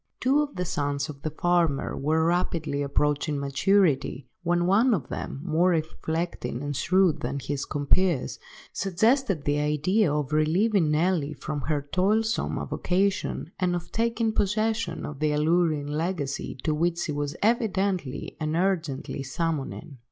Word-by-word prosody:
Two 275 +4 +3
of 290 -1 -4
the 180 - -2
sons 145 -5 -1
of 140 -2 -8
the 155 - -2
farmer 165 -2 +1
were 160 +3 +1
rapidly 165 -4 0
approaching 145 +1 0
maturity, 140 -2 +1
when 175 0 +1
one 215 +6 +4
of 145 -9 -5
them, 135 - -5
more 175 +1 +2
reflecting 160 -4 -2
and 145 0 -3
shrewd 185 +3 +3
than 130 +3 -2
his 140 0 -3
compeers, 145 -2 +1 0.3
suggested 200 - +1
the 145 0 +1
idea 150 +6 +2
of 150 -1 -1
relieving 170 +4 +3
Nelly 155 -1 +1
from 150 -2 -4
her 150 -2 -1
toilsome 210 +8 +1
avocation, 190 -3 -1
and 180 -1 +1
of 175 0 -6
taking 230 -1 0
possession 215 -3 0
of 145 -2 -7
the 155 -1 +1
alluring 155 -1 +2
legacy 150 -3 -3
to 155 - +1
which 170 +2 +1
she 170 - -2
was 145 +1 -3
evidently 195 - 0
and 155 0 -1
urgently 165 -7 -1
summoning. 145 0 -3
165 Hz, 145 wpm, -26 LUFS, 145-185 Hz, 0.3 s, one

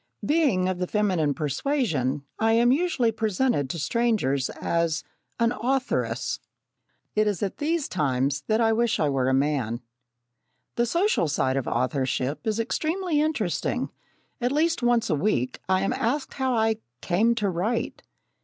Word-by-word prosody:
Being 280 - +2
of 185 -1 -2
the 180 - -1
feminine 180 -9 +1
persuasion, 150 - -1
I 225 0 +3
am 235 +2 +4
usually 275 -6 +2
presented 215 - 0
to 170 - -3
strangers 165 - +1
as 170 -1 -1 0.4
"an 230 0 +3
authoress." 260 +2 -1 0.7
It 215 0 +2
is 205 -3 -1
at 195 - -2
these 315 0 0
times 140 -3 0
that 220 +1 +2
I 225 -1 +3
wish 230 0 +1
I 150 - +2
were 130 -2 +1
a - - +2
man. 135 -5 0 1.0
The 240 0 +1
social 340 - +2
side 135 -3 0
of 135 -3 -1
authorship 130 - -1
is 220 0 0
extremely 315 +7 0
interesting. 280 - -1 0.5
At 245 +1 +1
least 325 +2 +1
once 240 -1 +2
a - - +4
week, 140 - 0
I 185 0 +3
am 195 - 0
asked 265 +5 -1
how 260 -2 0
I 220 -1 +2 0.2
"came 220 +7 +2
to 210 -3 0
write." 195 +6 -1
215 Hz, 155 wpm, -26 LUFS, 150-245 Hz, 1.0 s, am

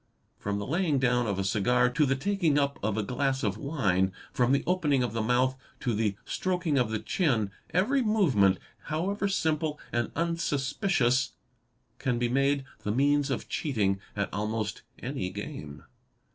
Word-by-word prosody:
From 100 0 -2
the 100 - -3
laying 165 -1 +1
down 125 -2 +2
of 100 -2 -1
a 95 - 0
cigar 120 +6 +3
to 140 +4 +2
the 135 - +2
taking 170 0 +1
up 140 -1 +1
of 110 +1 -1
a 110 - +1
glass 130 +4 -1
of 100 -3 +1
wine, 95 - +1 0.2
from 125 0 +2
the 140 - +3
opening 150 -8 +2
of 120 - -2
the 115 - 0
mouth 125 +3 +2 0.3
to 120 - 0
the 105 -2 0
stroking 180 -6 0
of 120 -3 +1
the 110 - 0
chin, 110 - 0 0.2
every 240 +10 +2
movement, 145 - +3 0.3
however 195 +6 -1
simple 160 -5 0
and 120 0 -1
unsuspicious, 145 - +1 0.7
can 130 -3 0
be 120 0 0
made 140 +2 +2 0.2
the 105 - -2
means 145 +4 +2
of 135 - -2
cheating 105 -9 0 0.2
at 100 -1 -2
almost 110 +1 -2 0.2
any 125 -8 -3
game. 75 -4 -7
130 Hz, 165 wpm, -28 LUFS, 110-150 Hz, 0.7 s, cigar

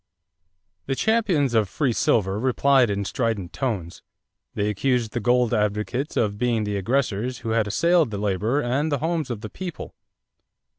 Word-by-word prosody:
= 85 +5 -51
The 135 - 0
champions 185 - +1
of 110 -4 +2
free 130 +3 0
silver 100 -3 +1
replied 130 0 +3
in 100 0 -2
strident 110 - -2
tones. 100 -11 -3 0.5
They 105 - 0
accused 115 +2 0
the 120 - -2
gold 120 +1 +2
advocates 105 +6 -1
of 105 -2 0
being 120 -3 +1
the 105 0 -2
aggressors 120 +2 -1
who - - -1
had 110 -1 +1
assailed 170 - +3
the 105 - -4
labor 105 +7 0
and 140 +5 0
the 145 - +1
homes 160 0 -2
of 115 -4 -4
the 110 - -6
people. 180 -3 -7
115 Hz, 165 wpm, -24 LUFS, 105-135 Hz, 0.5 s, replied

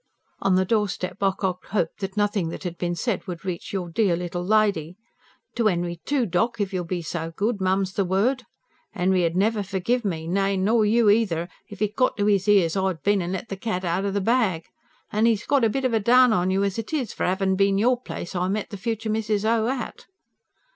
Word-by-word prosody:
On 190 -1 +2
the 185 0 +3
doorstep 195 -3 -1
Ocock 190 -2 -1
hoped 175 -6 -2
that 195 0 -5
nothing 205 -4 +1
that - - -7
had 175 -2 -4
been 175 -1 -1
said 210 +2 -2
would 175 0 -7
reach 180 -2 -4
"your 185 -3 -3
dear 180 +1 +1
little 175 0 -4
lady." 195 -5 +1 0.6
"To 230 -2 +1
'Enry, 175 -3 -1
too, 280 -4 +1
doc., 225 +5 0
if 200 -1 -2
you'll 180 -2 -2
be 175 0 -3
so 165 +1 -4
good, 210 +1 -1
mum's 190 0 +1
the 200 - +1
word! 215 +8 0 0.5
'Enry 185 -1 +2
'ud 165 - -4
never 210 +3 +2
forgive 200 +6 -1
me, 165 -5 -3
nay, 195 +2 +1
or 220 -1 +3
you 230 +2 +3
eether, 205 -6 +2 0.2
if 205 0 -4
it 210 0 -2
got 255 -4 +1
to 205 0 +1
'is 200 -1 +2
'ears 195 -5 +4
I'd 190 -6 -1
bin 205 -1 +2
an' 175 +1 -3
let 190 +4 -5
the 195 - -3
cat 190 -3 -3
outer 185 +4 0
the 200 +1 -1
bag. 200 -7 +1 0.5
An' 215 +2 +2
'e's 225 -2 +1
got 280 -4 +2
a 225 - +4
bit 270 +4 -2
of 250 - +1
a 225 - +3
down 245 +2 +5
on 180 -2 +1
you 190 +1 +1
as 200 +2 -1
it 225 +7 -6
is, 265 -8 -1
for - - -4
it - - +2
'avin' 190 0 +1
bin 195 0 +2
your 245 +4 +2
place 175 - -7
I 180 +1 0
met 205 +2 -2
the 200 - -5
future 225 +1 -3
Mrs. 215 -1 -1
O. 225 0 +2
at." 255 -2 -4
195 Hz, 230 wpm, -24 LUFS, 180-220 Hz, 0.6 s, down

